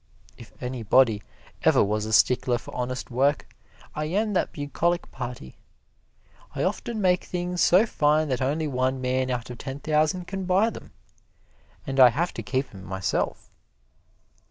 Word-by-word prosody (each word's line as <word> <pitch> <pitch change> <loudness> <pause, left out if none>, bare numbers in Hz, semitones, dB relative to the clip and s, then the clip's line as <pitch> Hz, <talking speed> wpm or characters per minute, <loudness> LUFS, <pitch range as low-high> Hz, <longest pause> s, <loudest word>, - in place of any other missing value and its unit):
If 115 - -13
anybody 120 -2 +2 0.4
ever - - +4
was 105 +1 -1
a - - -4
stickler 125 +2 +3
for - - -11
honest 125 +1 -4
work, 140 +4 0 0.4
I 150 - -3
am 205 +6 0
that 185 - 0
bucolic 165 +4 -2
party. 120 - -7 1.0
I - - -1
often 230 -2 -2
make 180 -2 +2
things 180 0 -3
so 185 +6 +5
fine 155 -6 +2
that 130 -1 -1
only 150 +4 0
one 130 -1 0
man 130 0 0
out 125 -1 -3
of 120 - -9
ten 135 +1 -6
thousand 155 +4 +1
can 195 +1 -5
buy 195 +5 +3
them, - - -11 0.9
and 135 -1 -2
I 130 -1 +10
have 165 +9 -1
to - - -5
keep 130 +6 -2
'em 95 -1 -11
myself. 95 -1 -3
135 Hz, 155 wpm, -25 LUFS, 125-170 Hz, 1.0 s, I